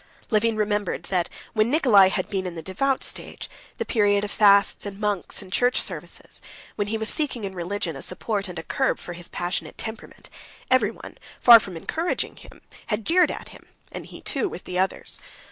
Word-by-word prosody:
Levin 225 +1 +3
remembered 210 -4 -1
that 175 -1 0 0.2
when 215 0 +2
Nikolay 235 - +6
had 185 -1 -2
been 190 -2 -2
in 175 - -6
the 165 - -6
devout 260 - 0
stage, - - -4 0.3
the - - -2
period 205 -3 +2
of 205 - -3
fasts 200 -1 +5
and 200 0 -8
monks 205 -1 -1
and 185 0 -11
church 245 0 +3
services, - - -5 0.3
when 205 -1 -1
he 220 +2 -1
was 220 0 -2
seeking 270 -6 -1
in 195 -1 -4
religion 175 -2 -3
a 135 - -7
support 200 +2 -2
and 180 - -8
a 160 - -5
curb 265 +8 0
for 175 - -8
his 175 0 -10
passionate 175 +2 -4
temperament, 220 0 -6 0.4
everyone, 230 -4 0 0.2
far 235 -2 +10
from 190 -5 -7
encouraging 325 - -2
him, - - -15 0.2
had 210 -1 -2
jeered 360 +2 +4
at - - -6
him, - - -15 0.2
and - - -7
he, - - -11
too, 415 - -1
with 180 - -8
the 180 0 -3
others. 190 +1 -2
205 Hz, 195 wpm, -24 LUFS, 185-225 Hz, 0.4 s, far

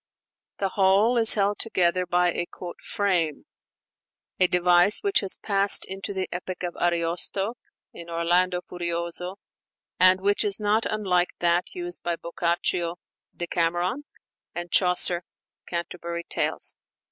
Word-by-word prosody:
The 195 - -1
whole 195 +5 +3
is 225 -2 +7
held 205 0 0
together 180 -4 +1
by 175 0 +2
a 175 - -3 0.3
"frame"; 175 -7 -1 0.9
a 185 - +5
device 180 +2 +3
which 400 -2 +3
has 195 -2 +1
passed 200 -1 +3
into 195 +1 -6
the 190 -1 -3
epic 180 +1 -6
of 175 -1 -4
Ariosto 175 +5 -1 0.4
('Orlando 175 +2 0
Furioso,' 170 +1 -4
xxviii.), 200 - -63
and 185 0 +1
which 205 +1 +2
is 205 0 +1
not 210 +1 +1
unlike 185 -4 0
that 175 - 0
used 355 0 -4
by 175 -1 -2
Boccaccio 170 0 -2 0.4
('Decameron') 175 +9 -1 0.5
and 175 0 -6
Chaucer 180 -1 +4 0.4
('Canterbury 170 0 -5
Tales'). - - 0
180 Hz, 125 wpm, -25 LUFS, 175-200 Hz, 0.9 s, is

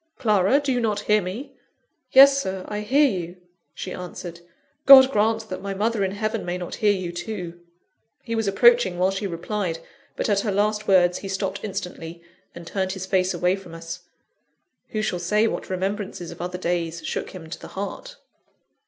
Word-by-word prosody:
Clara, 210 +2 +3
do 285 -2 -1
you 250 - +1
not 210 -3 0
hear 210 0 +2
me?" 200 +10 -6 0.6
"Yes, 275 +1 +8
Sir, 190 -5 -4
I 210 - -4
hear 270 +8 +3
you," 180 -6 -4 0.4
she 185 - -6
answered. 175 -1 -8 0.5
"God 270 -1 +10
grant 220 0 +1
that 185 - -5
my 195 0 -4
mother 215 +1 0
in 190 0 -1
heaven 215 +1 -2
may 175 +1 -3
not 180 -1 -6
hear 210 -1 +5
you 185 -3 -2
too!" 175 -1 -6 0.6
He 230 - -5
was 225 -2 -1
approaching 215 -2 +4
while 185 +2 +2
she 195 +1 -3
replied; 175 0 -3 0.4
but - - -2
at 205 -2 +2
her 205 0 -1
last 210 +2 0
words, 180 -2 +4
he 195 - -7
stopped 195 0 -3
instantly, 180 -4 -6 0.3
and 170 - -9
turned 190 +1 -2
his 190 -1 -5
face 185 -1 +1
away 180 +2 +1
from 185 -4 -11
us. 165 0 -7 0.9
Who 215 -1 -3
shall 180 -4 -1
say 210 +5 +2
what - - -3
remembrances 190 -1 -3
of - - -9
other 180 +1 -4
days 170 -2 -2
shook - - -3
him 175 -4 -10
to - - -6
the - - -10
heart? - - -5
195 Hz, 190 wpm, -24 LUFS, 180-215 Hz, 0.9 s, God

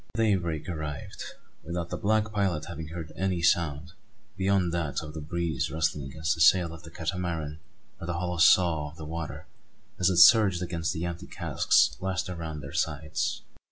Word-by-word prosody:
Daybreak 95 -9 0
arrived 80 -5 -5 0.4
without 85 +1 -4
the - - -1
black 110 +1 +1
pilot 95 -7 0
having 80 -2 -7
heard 80 -1 -7
any 90 -2 -1
sound, 85 -2 +1 0.4
beyond 95 -3 +1
that 80 -5 -1
of 75 0 -8
the 80 - -6
breeze 85 +1 -2
rustling 75 -3 -1
against 80 +4 -1
the 80 - -4
sail 85 0 +5
of 80 - -10
the 85 - -11
Catamaran 80 -3 -3 0.4
or 85 - -7
the 85 - -1
hollow 90 0 -2
"sough" 80 -2 +5
of 75 - -16
the 80 - -7
water 80 0 -6 0.5
as 90 +1 +4
it 90 - 0
surged 95 0 +7
against 85 -2 -2
the 80 +2 -3
empty 85 0 -5
casks - - +2
lashed 95 -1 -2
along 80 -4 -5
their 70 -1 -9
sides. 75 0 -2
85 Hz, 175 wpm, -28 LUFS, 80-90 Hz, 0.5 s, surged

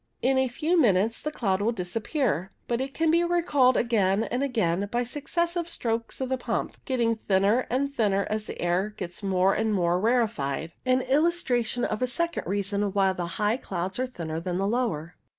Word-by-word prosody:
In 260 +1 +3
a 265 - +2
few 320 +7 +1
minutes 220 -1 +2
the 305 - -2
cloud 195 -9 0
will 220 +3 +2
dis 180 -3 -5
appear, 215 - 0 0.2
but 240 +1 0
it 270 +1 -3
can 325 -1 +2
be 340 +1 +4
recalled 325 -7 +3
again 210 -3 +2
and 245 +3 -2
again 205 -8 0
by 240 +1 +1
successive 340 +6 -2
strokes 230 -6 -2
of 260 -1 -2
the 260 -1 -1
pump, - - -2
getting 235 -3 +1
thinner 205 +3 +2
and 275 +3 0
thinner 200 -4 +2
as 215 0 -3
the - - -7
air 185 +5 0
gets 175 -1 -6
more 190 -1 +2
and 220 -1 0
more 175 -1 +2
rarefied; 205 - 0 0.2
an 255 0 +3
illustration 260 -5 +1
of 215 - -3
a 255 - +2
second 340 +7 -2
reason 200 +1 -1
why 195 -2 +3
the 175 -2 -3
high 210 +3 +1
clouds 190 -3 -4
are 255 - 0
thinner 165 -9 -5
than 175 +1 -3
the 195 - 0
lower. 200 -9 -1
225 Hz, 195 wpm, -26 LUFS, 190-260 Hz, 0.2 s, be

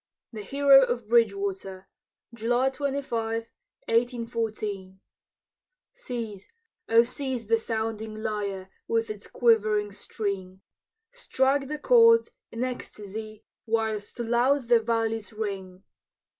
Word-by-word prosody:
THE 215 - -6
HERO 275 +5 +6
OF 245 -4 -1
BRIDGEWATER 195 -4 0 0.5
[July 240 +3 +1
25, 235 -5 -3 0.4
1814] 225 -5 -2 0.9
Seize, 230 - -6 0.4
O 230 +1 +6
seize 255 -1 -4
the 225 +2 +2
sounding 220 -1 -3
lyre, 205 -3 -4 0.2
With 225 -1 0
its 210 -1 -9
quivering 215 -3 +2
string! 195 -2 -5 0.5
Strike 275 - 0
the 300 +2 -4
chords, 460 +6 +5 0.2
in 230 +2 -3
ecstasy, 215 -3 -6 0.2
Whilst 220 -2 -1
loud 240 +2 +1
the 240 -1 +6
valleys 225 -2 -1
ring! 195 -3 -5
225 Hz, 100 wpm, -27 LUFS, 210-245 Hz, 0.9 s, HERO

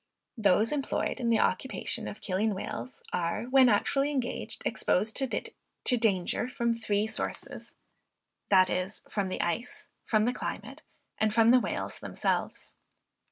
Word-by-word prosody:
Those 215 -1 +3
employed 285 -1 -1
in 235 -2 0
the 230 - +3
occupation 230 +2 0
of - - -8
killing 200 +2 0
whales, 125 -9 -6
are, 170 +3 -1
when 255 +1 +5
actually 275 +6 +2
engaged, 260 -4 -3
exposed 215 +4 +1
to 260 -1 0
danger 210 -1 +1
from 235 -2 0
three 215 -2 0
sources, 220 - -5 0.7
viz. 185 +1 +2
from 200 -3 -2
the - - -2
ice, 220 +8 -3 0.2
from 215 -1 +3
the 245 - +1
climate, - - -6 0.4
and 220 -1 +2
from 225 +1 +4
the 250 +1 +7
whales - - -4
themselves. - - -3
220 Hz, 135 wpm, -29 LUFS, 195-245 Hz, 0.7 s, the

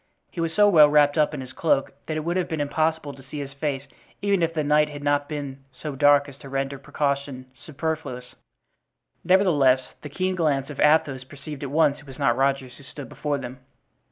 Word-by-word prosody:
He 170 - -4
was 165 -1 -1
so 205 +4 +4
well 155 -7 +7
wrapped 145 -1 +4
up 150 -2 +2
in 150 -3 -5
his 130 -1 -10
cloak 145 -4 +1 0.2
that 155 - -2
it - - -1
would 170 +3 -2
have 185 -1 -1
been 160 - -3
impossible 155 0 -1
to 135 - -14
see 135 +3 -9
his 140 -1 -6
face 140 -1 -3 0.4
even 200 -2 +1
if 165 0 +1
the 160 -2 -1
night 150 +1 +3
had 145 -1 -8
not 145 0 +1
been 140 -3 -6
so 145 +2 -7
dark 145 +1 +4
as 140 -2 -12
to 140 - -12
render 135 0 -3
precaution 140 -2 -2
superfluous; 150 -4 -5 0.9
nevertheless, 145 -9 +3
the 150 - -8
keen 185 +5 -1
glance 150 -5 0
of 145 - -10
Athos 150 -3 +3
perceived 140 +2 -10
at 140 - -4
once 150 0 +2
it 145 - -17
was 135 -1 -11
not 140 - +2
Rogers 135 -2 -1
who - - -14
stood 140 +1 -10
before 145 -1 -2
them. 130 -1 -8
145 Hz, 215 wpm, -24 LUFS, 135-155 Hz, 0.9 s, well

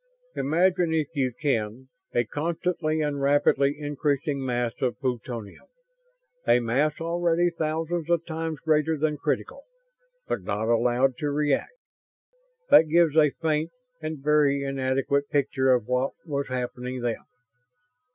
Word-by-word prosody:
Imagine, 175 +2 +2
if 155 -3 0
you 135 -4 0
can, 125 -2 -2 0.2
a 120 - +2
constantly 160 +4 -2
and 145 -2 -1
rapidly 140 0 +3
increasing 145 -1 -1
mass 120 -2 -1
of 125 -2 -1
plutonium 120 -5 -4 0.8
a - - +5
mass 130 +6 +1
already 170 +1 +1
thousands 165 +1 -2
of 170 -1 +1
times 160 -1 -4
greater 155 0 +2
than 150 0 0
critical, - - -2 0.7
but - - -2
not 105 +4 -2
allowed 125 +2 +2
to 150 - -1
react! 145 - 0 1.0
That 160 - +7
gives 165 -1 +4
a 155 -2 +6
faint 155 +2 -1 0.3
and 155 0 -4
very 145 -2 +3
inadequate 135 +1 0
picture 135 -2 +1
of 125 -4 +2
what 125 +3 0
was 140 -3 -2
happening 125 0 -4
then. 120 -2 -2
145 Hz, 130 wpm, -26 LUFS, 130-160 Hz, 1.0 s, That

